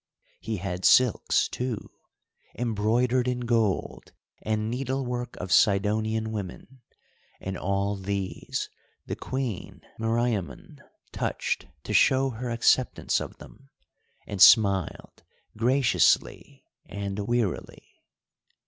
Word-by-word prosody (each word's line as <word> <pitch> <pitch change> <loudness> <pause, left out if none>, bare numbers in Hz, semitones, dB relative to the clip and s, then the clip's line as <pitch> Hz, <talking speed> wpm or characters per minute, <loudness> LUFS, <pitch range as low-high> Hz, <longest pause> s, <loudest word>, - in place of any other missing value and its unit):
He 110 -1 -4
had 90 -1 -5
silks, 125 -3 +4
too, 125 -3 -4 0.7
embroidered 120 +2 +1
in 125 -1 -1
gold, 115 -5 -1 0.3
and 110 0 -1
needlework 125 0 -3
of 90 0 -6
Sidonian 110 +2 +2
women, 110 +5 -7 0.6
and 95 0 -5
all 100 +2 -1
these 100 -1 -4 0.4
the - - -4
Queen 130 -7 -5 0.2
Meriamun 115 -4 -2 0.3
touched - - -2 0.2
to - - -4
show 135 0 +4
her 120 +2 -5
acceptance 120 +2 +2
of - - -7
them, 135 +1 -16 0.6
and 100 -2 -5
smiled 100 - +5 0.3
graciously 125 +4 +1 0.2
and 100 0 -5
wearily. 120 -6 -2
110 Hz, 95 wpm, -26 LUFS, 100-125 Hz, 0.7 s, smiled